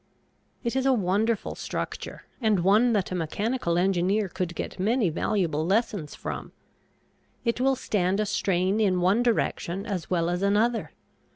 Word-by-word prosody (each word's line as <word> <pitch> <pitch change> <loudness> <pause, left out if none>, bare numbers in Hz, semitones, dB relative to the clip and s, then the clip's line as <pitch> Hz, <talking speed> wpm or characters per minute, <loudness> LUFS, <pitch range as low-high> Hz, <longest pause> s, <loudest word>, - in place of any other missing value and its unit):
It 235 0 -2
is 265 0 +1
a 265 - +5
wonderful 210 +2 0
structure, - - -5 0.2
and 215 -5 +2
one 210 +7 +4
that 200 -4 0
a - - -1
mechanical 180 +2 -1
engineer 190 +2 +1
could 175 -1 -3
get - - -5
many 215 -1 +2
valuable 165 -3 0
lessons 195 -3 0
from. - - -6 0.9
It 235 +1 0
will 270 +1 +3
stand 195 -5 0
a 215 - +1
strain 190 0 +1
in 190 -4 +2
one 190 +6 +3
direction 200 -5 0
as 190 -7 -4
well 170 -1 +1
as 175 +1 -2
another. 215 +4 +1
200 Hz, 155 wpm, -26 LUFS, 180-225 Hz, 0.9 s, a